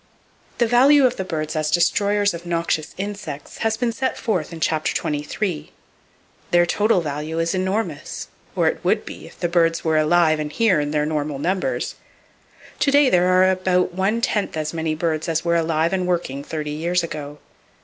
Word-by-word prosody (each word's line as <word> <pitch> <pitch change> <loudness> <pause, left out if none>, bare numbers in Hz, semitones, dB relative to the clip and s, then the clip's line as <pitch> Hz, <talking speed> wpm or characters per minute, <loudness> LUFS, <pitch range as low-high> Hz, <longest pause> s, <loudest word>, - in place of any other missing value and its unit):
The 240 - +3
value 265 +4 +5
of 250 0 +1
the 190 - -2
birds 155 -4 -4
as 155 0 0
destroyers 200 +3 +2
of 170 0 -7
noxious 170 -2 -2
insects, 190 -8 -6
has 225 -1 0
been 240 0 0
set 260 +3 -2
forth 185 -10 -2
in 165 - -8
Chapter 155 -1 0
XXIII. 150 +2 -3 0.8
Their 175 0 +4
total 205 +1 +2
value 150 +1 -4
is 165 0 0
enormous—or 185 -4 -3
it - - -1
would - - +1
be - - -9
if - - -17
the 175 - 0
birds 165 -1 +2
were 160 -1 +2
alive 155 0 +3
and 150 -1 -3
here 215 -3 +3
in 145 0 -1
their 150 0 0
normal 150 -2 -2
numbers. 185 - -1 0.9
To - - +2
day 280 -1 +5
there 180 0 +4
are 185 0 +5
about 185 -1 +1
one 195 +5 0
tenth 205 -7 -1
as 155 0 -3
many 160 -1 -1
birds 160 0 -1
as 165 0 -1
were 170 0 +2
alive 165 +1 +1
and 185 -1 0
working 170 -6 -2
thirty 150 0 -4
years 170 +4 0
ago. 150 -3 -6
170 Hz, 180 wpm, -22 LUFS, 155-195 Hz, 0.9 s, value